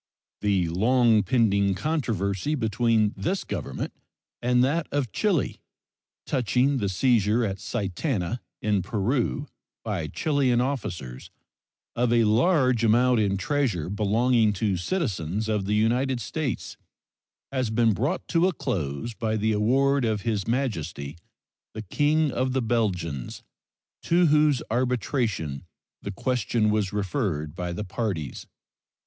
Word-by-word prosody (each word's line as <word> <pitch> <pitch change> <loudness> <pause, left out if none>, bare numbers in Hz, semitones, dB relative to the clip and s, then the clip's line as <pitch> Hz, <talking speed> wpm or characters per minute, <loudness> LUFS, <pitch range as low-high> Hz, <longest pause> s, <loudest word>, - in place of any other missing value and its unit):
The 100 -4 +1
long 115 +5 +3
pending 100 -6 +2
controversy 115 - -1
between 110 -3 +1
this 190 +3 -2
Government - - -5 0.5
and 125 +1 +3
that 150 +4 0
of 140 -6 -1
Chile 195 -9 0 0.7
touching 130 +1 +1
the 100 -3 0
seizure 115 +2 +2
at 95 -2 -3
Sitana, 115 - -2 0.2
in 105 -2 +2
Peru, 120 - -1 0.4
by 95 -8 -2
Chilean 135 - +1
officers, 95 - -4 0.7
of 120 0 +1
a 120 -1 +4
large 125 +1 +3
amount 120 +2 +4
in 100 -2 +1
treasure 105 - -1
belonging 110 +2 +2
to 100 0 0
citizens 100 - -2
of 105 -3 0
the 105 +2 0
United 120 +4 +1
States 135 +4 -4 0.7
has 130 -4 -1
been 115 0 +3
brought 140 - -2
to 170 +2 +3
a 190 - 0
close 80 - -3
by 110 -1 -1
the 110 +1 +1
award 135 +6 +2
of 110 -3 0
His 105 -3 -2
Majesty 85 - -2 0.6
the 110 - -5
King 150 - +1
of 130 +1 -1
the 130 - +1
Belgians, 90 - -2 0.6
to 175 +1 +3
whose 150 -3 +3
arbitration 120 - -1 0.4
the - - -5
question 115 -1 0
was 105 -3 0
referred 95 - -2
by 90 0 -3
the 85 +5 -4
parties. 95 - -4
115 Hz, 125 wpm, -26 LUFS, 100-130 Hz, 0.7 s, a